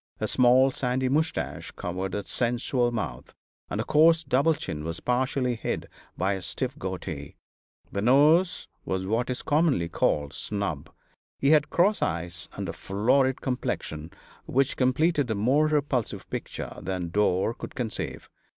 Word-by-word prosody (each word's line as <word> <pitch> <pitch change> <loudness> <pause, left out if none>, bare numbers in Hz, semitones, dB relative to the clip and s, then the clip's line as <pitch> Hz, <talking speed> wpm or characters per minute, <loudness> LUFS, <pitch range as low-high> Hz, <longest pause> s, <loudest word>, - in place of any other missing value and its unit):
A - - -1
small, 130 +2 +5
sandy 130 0 -1
moustache 155 +4 -1
covered 90 +2 -4
a 100 -1 -3
sensual 120 +1 0
mouth, 75 - -5 0.3
and - - -3
the - - +1
coarse 160 +2 +5
double 140 +3 +3
chin 75 - -5
was 80 +1 -4
partially 125 0 0
hid - - -3 0.3
by 95 +3 +1
a 95 - -4
stiff 130 +8 -3
goatee. 85 - -5 0.6
The 100 - -2
nose 150 - +4 0.2
was 95 0 -2
what 115 +5 0
is 125 - -3
commonly 145 - +2
called 75 -3 0
"snub;" 100 -8 -3 0.5
he 140 - +3
had 150 -2 +4
cross 200 +5 +3
eyes 85 0 -3
and - - -4
a - - -4
florid 130 +7 +1
complexion, 80 - -3 0.4
which 135 +1 +1
completed 140 +2 +2
a 110 - 0
more 130 +9 +3
repulsive 145 -6 -1
picture - - -5
than 90 -1 -3
Dore 100 +2 +2
could - - -9
conceive. 115 -4 -4
125 Hz, 150 wpm, -27 LUFS, 95-140 Hz, 0.6 s, small